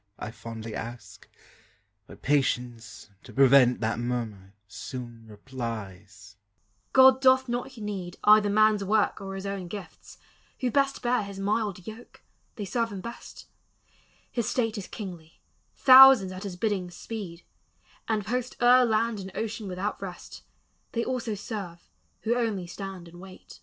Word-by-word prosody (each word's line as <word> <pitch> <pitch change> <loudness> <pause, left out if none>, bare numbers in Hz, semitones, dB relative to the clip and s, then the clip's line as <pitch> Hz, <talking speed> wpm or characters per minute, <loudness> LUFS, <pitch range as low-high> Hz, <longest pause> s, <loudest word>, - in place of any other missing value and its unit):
I 110 - -6
fondly 115 -1 -8
ask. 120 +2 -8 0.8
But - - -14
Patience, 125 -6 -1
to - - -13
prevent 135 -2 +5
That 110 0 -1
murmur, 110 -5 -4
soon 120 +1 -8
replies, 105 -4 -8 0.5
"God 260 0 +7
doth 260 0 +5
not 245 +1 -4
need 200 -5 -5
Either 210 0 +6
man's 215 0 +3
work 210 +1 +1
or 195 0 -6
his 195 +1 -6
own 195 -2 -4
gifts; 185 -2 -10 0.4
who 255 -2 -1
best 275 0 +1
Bear 245 0 +2
his 200 -1 -8
mild 200 -2 -2
yoke, 220 +2 -11 0.3
they 205 - -5
serve 230 +3 -1
him 200 - -6
best: 235 +3 -10 0.9
his 235 -3 -1
state 225 -3 0
Is 205 -4 -6
kingly; 175 -7 -9 0.4
thousands 260 -7 +8
at 185 +2 -7
his 190 -3 -5
bidding 190 -2 -1
speed, 175 -3 -8 0.6
And 215 -3 -1
post 250 +2 -3
o'er 250 +1 +6
land 225 -1 +1
and 190 0 -7
ocean 220 -1 -4
without 190 +3 -4
rest; 185 -3 -8 0.5
They 230 0 -1
also 245 -4 -2
serve 200 -4 -7 0.3
who 230 - +1
only 220 -7 -1
stand 185 0 -8
and 175 +1 -14
wait." 190 -1 -13
195 Hz, 145 wpm, -27 LUFS, 140-225 Hz, 0.9 s, thousands